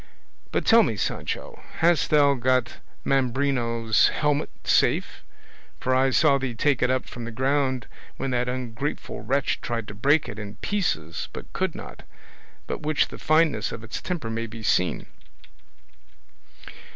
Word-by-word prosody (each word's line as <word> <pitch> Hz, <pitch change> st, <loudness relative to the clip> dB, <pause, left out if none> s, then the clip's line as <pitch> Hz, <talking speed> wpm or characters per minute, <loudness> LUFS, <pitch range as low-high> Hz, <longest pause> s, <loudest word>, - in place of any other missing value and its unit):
But -, -, -1 dB
tell 230 Hz, 0 st, +7 dB
me, 115 Hz, -, +1 dB
Sancho, -, -, -3 dB
hast 170 Hz, -2 st, +2 dB
thou 145 Hz, -2 st, +5 dB
got 130 Hz, -1 st, +1 dB, 0.3 s
Mambrino's 125 Hz, -4 st, +2 dB
helmet 150 Hz, 0 st, 0 dB
safe? -, -, +2 dB, 0.6 s
for 130 Hz, -, 0 dB
I 130 Hz, +1 st, +4 dB
saw 140 Hz, +1 st, +4 dB
thee 130 Hz, -3 st, -3 dB
take 140 Hz, +3 st, +1 dB
it 125 Hz, -, +3 dB
up 130 Hz, 0 st, 0 dB
from 120 Hz, -, -8 dB
the 115 Hz, -, -5 dB
ground 130 Hz, 0 st, 0 dB, 0.3 s
when 135 Hz, -, -2 dB
that 125 Hz, 0 st, 0 dB
ungrateful 130 Hz, +2 st, -4 dB
wretch 140 Hz, +1 st, 0 dB
tried 115 Hz, -2 st, -3 dB
to -, -, -7 dB
break 140 Hz, +9 st, +2 dB
it 105 Hz, -, -7 dB
in 105 Hz, -1 st, -7 dB
pieces 105 Hz, -, -2 dB
but -, -, -9 dB
could -, -, -1 dB
not, -, -, -9 dB, 0.6 s
by -, -, -3 dB
which 150 Hz, -1 st, +1 dB
the -, -, -10 dB
fineness 155 Hz, -8 st, +2 dB
of 115 Hz, -, -7 dB
its 110 Hz, -, -6 dB
temper 160 Hz, -11 st, -3 dB
may 115 Hz, +1 st, -3 dB
be 110 Hz, 0 st, -9 dB
seen." 90 Hz, -3 st, +1 dB
130 Hz, 150 wpm, -25 LUFS, 115-145 Hz, 0.6 s, tell